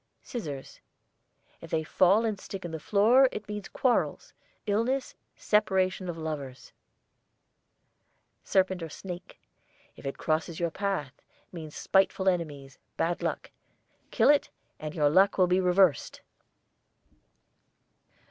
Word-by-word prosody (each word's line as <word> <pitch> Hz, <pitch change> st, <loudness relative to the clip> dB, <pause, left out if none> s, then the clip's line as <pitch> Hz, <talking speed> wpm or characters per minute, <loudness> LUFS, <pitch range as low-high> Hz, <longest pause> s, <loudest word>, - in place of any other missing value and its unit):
SCISSORS. 150 Hz, -, -7 dB, 0.8 s
If 165 Hz, -, -10 dB
they 160 Hz, 0 st, 0 dB
fall 190 Hz, +7 st, +3 dB
and 215 Hz, -3 st, -2 dB
stick 195 Hz, -2 st, -7 dB
in 170 Hz, -, -5 dB
the 160 Hz, -, -5 dB
floor 225 Hz, -, +4 dB
it 210 Hz, -, -7 dB
means 210 Hz, -1 st, -6 dB
quarrels, 255 Hz, -2 st, 0 dB, 0.3 s
illness, 230 Hz, +6 st, 0 dB, 0.2 s
separation 190 Hz, -3 st, +1 dB
of 170 Hz, -, -4 dB
lovers. 145 Hz, -5 st, -6 dB, 1.7 s
SERPENT 190 Hz, -1 st, +1 dB
OR 165 Hz, -, -5 dB
SNAKE. 180 Hz, +2 st, -9 dB, 0.6 s
If -, -, -8 dB
it 135 Hz, -, -4 dB
crosses 160 Hz, +1 st, -1 dB
your 170 Hz, -1 st, 0 dB
path, 185 Hz, -10 st, -3 dB, 0.3 s
means 160 Hz, -4 st, -8 dB
spiteful 190 Hz, 0 st, +2 dB
enemies, 145 Hz, -7 st, -2 dB, 0.2 s
bad 170 Hz, +1 st, 0 dB
luck. -, -, -3 dB, 0.6 s
Kill -, -, +3 dB
it 295 Hz, -, +2 dB, 0.3 s
and 155 Hz, +2 st, -6 dB
your 150 Hz, -3 st, +3 dB
luck 195 Hz, +4 st, +4 dB
will 185 Hz, -, +5 dB
be 180 Hz, +1 st, +2 dB
reversed. 180 Hz, -3 st, +2 dB
180 Hz, 120 wpm, -28 LUFS, 160-200 Hz, 1.7 s, will